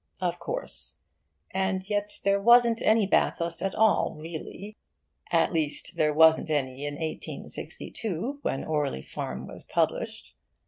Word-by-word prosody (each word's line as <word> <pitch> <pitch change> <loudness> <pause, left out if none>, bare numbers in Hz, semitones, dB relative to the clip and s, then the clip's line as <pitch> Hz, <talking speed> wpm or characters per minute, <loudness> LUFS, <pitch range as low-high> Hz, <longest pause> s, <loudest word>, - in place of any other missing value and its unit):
Of - - -1
course. - - -3 0.5
And 190 0 -1
yet 205 0 -2
there 200 0 +2
wasn't 235 +1 +6
any 220 -1 +4
bathos 170 -3 +1
at 195 - -1
all, 220 -5 +3
really. 170 +6 -7 0.6
At - - +3
least, 155 -3 -1
there 150 -1 +2
wasn't 160 +1 +5
any 135 -2 -1
in 145 - -4
1862, 190 - -4
when 135 - -2
'Orley 145 - -1
Farm' 65 0 -5
was - - -9
published. - - -1
175 Hz, 130 wpm, -27 LUFS, 155-210 Hz, 0.6 s, wasn't